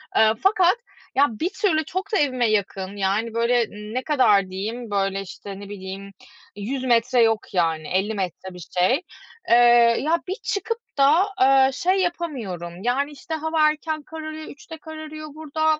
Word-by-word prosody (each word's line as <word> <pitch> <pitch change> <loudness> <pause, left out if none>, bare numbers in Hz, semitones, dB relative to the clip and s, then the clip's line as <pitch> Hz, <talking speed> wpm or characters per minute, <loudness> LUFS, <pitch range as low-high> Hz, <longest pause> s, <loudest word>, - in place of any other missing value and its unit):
eee, 220 0 +5
fakat 380 -2 +4 0.4
ya, 285 +2 +5
bir 235 - -2
türlü 315 -8 +1
çok 375 +4 -4
da - - +4
evime 255 -5 +2
yakın 200 -1 -1
yani, 200 +4 0
böyle 235 +1 +2 0.3
ne 255 +1 -2
kadar 210 -10 +3
diyeyim, 215 +4 -5
böyle 195 0 0
işte, 195 +1 -9
ne 200 - -10
bileyim, 195 0 -8 0.4
100 250 +6 -4
metre 245 0 +3
yok 225 -2 +1
yani, 165 -3 0
50 195 +4 0
metre 190 -1 -4
bir 180 -3 -10
şey. 255 - +3 0.5
Eee, 235 - +7 0.5
ya, 320 +4 +2
bir 375 - -2
çıkıp 435 +3 -2 0.2
da, 295 +7 +5 0.2
eee, 265 0 +5
şey 370 +6 +1
yapamıyorum. 225 - -4
Yani 270 +5 0
işte, 295 +3 -8
hava 315 0 +2
erken 310 0 -3
kararıyor, 310 0 -7
3'te 305 +2 -11
kararıyor 310 0 -8
burada. 315 0 0
255 Hz, 160 wpm, -23 LUFS, 200-310 Hz, 0.5 s, Eee